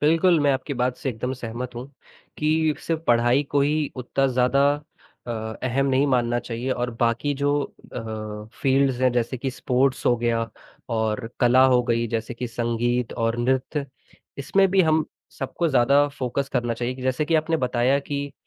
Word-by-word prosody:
बिल्कुल, 165 +3 +4
मैं 145 -1 +3
आपकी 135 +2 -3
बात 125 0 0
से 140 - -4
एकदम 125 +1 -3
सहमत 120 0 -6
हूँ, 120 +2 -6 0.5
कि 155 0 +2
सिर्फ 165 -1 -1
पढ़ाई 120 +3 +4
को 145 - +2
ही 150 +1 +1
उत्ता 130 +2 0
ज़्यादा 125 +1 +2 0.7
अ, - - -4 0.3
अहम 130 +2 +1
नहीं 135 +2 +3
मानना 120 -2 +1
चाहिए 120 +2 -4
और 120 -1 -1
बाकी 120 +4 +1
जो 145 +1 0
अ, 110 -1 -7
फ़ील्ड्स 135 -2 +2
हैं 130 0 +4
जैसे 120 +1 -1
कि 135 +2 -2
स्पोर्ट्स 130 +1 0
हो 120 - +4
गया 115 -1 0 0.5
और 110 +1 -1
कला 125 +1 +6
हो 125 -1 +4
गई 115 -1 0
जैसे 115 +1 -3
कि 125 +1 -4
संगीत 120 +1 -1
और 115 0 -1
नृत्य, 130 +4 0 0.5
इसमें 195 +8 +3
भी 195 0 +4
हम 155 -1 +2 0.3
सबको 165 +5 -1
ज़्यादा 140 +1 +4
फ़ोकस 140 -1 -3
करना 120 -2 0
चाहिए। 120 +2 -3
कि 130 - -9
जैसे 130 +4 0
कि 160 +2 0
आपने 160 +1 +2
बताया 125 0 +1
कि 140 0 -4
130 Hz, 175 wpm, -24 LUFS, 120-140 Hz, 0.7 s, कला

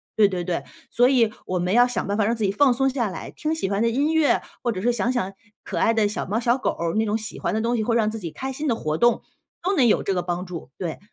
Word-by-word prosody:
对 210 -2 +5
对 180 -2 -3
对， 175 -1 -2 0.3
所 245 +1 +4
以 235 -5 +3
我 185 -1 -1
们 180 +2 0
要 245 +2 +6
想 245 - -2
办 200 - 0
法 215 - +2
让 225 - +2
自 225 - -3
己 195 - +1
放 265 +4 +4
松 270 +2 +2
下 250 -5 -1
来， 185 - -7
听 310 +1 -2
喜 255 -12 -2
欢 200 +1 0
的 230 - +3
音 285 +7 +1
乐， 320 -3 +3 0.2
或 245 - 0
者 185 -4 -4
是 240 +4 +2
想 235 +1 0
想 195 -6 -2 0.3
可 - - -4
爱 225 - +3
的 220 -2 +2
小 210 - -3
猫、 210 - -1
小 240 +1 +2
狗， 270 - -1 0.2
那 220 - +2
种 215 +1 0
喜 215 -1 -6
欢 - - -1
的 215 - 0
东 235 +2 0
西， 220 - 0
会 230 - +1
让 215 -2 +2
自 225 - -5
己 175 -5 -5
开 265 +9 -5
心 295 +4 -5
的 235 - +2
活 155 -4 -2
动， 240 +4 +3 0.4
都 375 +3 +1
能 265 - +5
有 215 - +3
这 195 - 0
个 180 - 0
帮 175 +1 -3
助， 175 -6 -8
对。 170 -4 -4
225 Hz, 325 characters per minute, -23 LUFS, 195-245 Hz, 0.4 s, 要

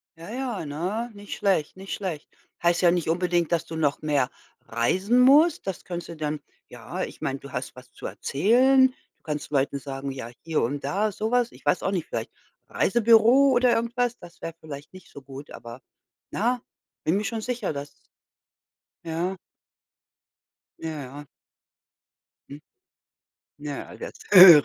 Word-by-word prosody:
ja, 165 +3 -11
ja, 245 -7 -3
ne, 185 +11 -3
nicht 205 0 -7
schlecht, 190 -7 +1
nicht 195 +1 -7
schlecht. 180 -7 -5 0.3
Heißt 170 0 +3
ja 175 -2 +6
nicht 175 -3 0
unbedingt, 175 0 +1
dass 170 -2 +1
du 160 - -7
noch 145 -3 +1
mehr 145 -4 +2 0.3
reisen 185 - +1
musst. 295 +6 +6
Das 190 - -4
könntest 175 -1 -5
du 170 - -7
dann 150 -1 -2 0.3
ja, - - -5
ich - - -7
meine, 135 0 -2
du 140 - -11
hast 130 -1 -5
was 125 -1 -14
zu - - -10
erzählen. 255 - +4 0.2
Du - - -45
kannst 150 0 -4
Leuten 140 0 +1
sagen: 135 0 -5
„Ja, 130 -3 -7
hier 160 -1 0
und 140 +4 -2
da“, 205 +9 0
so 220 +3 -3
was. 245 -1 +2
Ich - - -18
weiß - - +2
auch - - +1
nicht, - - -2
vielleicht - - -4 0.4
Reisebüro 235 +4 +5
oder 250 -1 +4
irgendwas, 240 +1 0
das 170 - -14
wäre 165 - -5
vielleicht 150 -1 -9
nicht 185 -2 -13
so 140 - -11
gut, 135 +2 -10
aber 120 +2 -10 0.5
na, 240 +3 0 0.4
bin 170 +5 +2
mir 210 - -1
schon 220 0 -2
sicher, 250 -6 -2
dass 145 0 -8 1.1
Ja. 170 +3 -2 1.5
Ja, 155 -3 -4
ja. 140 +3 -9 1.3
Mhm. 145 - -9 1.0
Ja, - - -6
das - - -7 0.2
höre 180 -6 +11
175 Hz, 165 wpm, -26 LUFS, 145-225 Hz, 1.5 s, höre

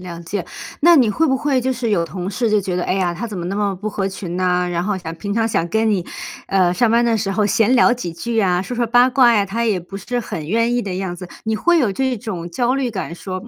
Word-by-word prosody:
了 175 -2 -8
解。 175 +2 -4 0.3
那 345 +3 +7
你 255 -8 +4
会 320 +10 +1
不 265 -3 +2
会 270 -1 +1
就 260 +1 0
是 240 -2 -2
有 170 -5 +2
同 180 +2 -5
事 230 +3 0
就 210 -1 +3
觉 185 -2 -3
得： 180 - -1
“哎 - - 0
呀， 185 -3 0
她 180 +7 -5
怎 215 -3 -7
么 175 - -4
那 195 +3 -3
么 205 -2 0
不 210 +4 -5
合 200 -1 -2
群 185 -2 -6
呢， 180 -1 +1
然 175 -1 -1
后 205 0 -1
想 165 -3 -6
平 200 +4 -4
常 225 0 +1
想 215 -6 0
跟 220 +4 +1
你， 185 -5 0 0.4
呃， 185 -2 +2
上 240 +6 +2
班 235 +2 +3
的 230 -1 +2
时 195 -2 -1
候 210 +2 +1
闲 225 +4 +3
聊 250 0 +5
几 210 -9 -4
句 230 +7 -3
啊， 185 -3 +2
说 245 +5 -6
说 240 0 +1
八 245 +2 +4
卦 245 -2 +5
呀， 205 -2 +3
她 225 +4 -2
也 210 -5 +1
不 180 +3 -9
是 245 +5 -3
很 160 -9 -6
愿 230 +6 +1
意 245 - +1
的 195 -5 -4
样 185 -1 -3
子。” 180 0 -9
你 220 0 -1
会 345 +9 +3
有 240 -7 +2
这 260 +5 -1
种 185 -6 -5
焦 245 +9 0
虑 270 -2 0
感 190 -5 -5
说 185 +1 -6
205 Hz, 305 characters per minute, -19 LUFS, 180-235 Hz, 0.4 s, 那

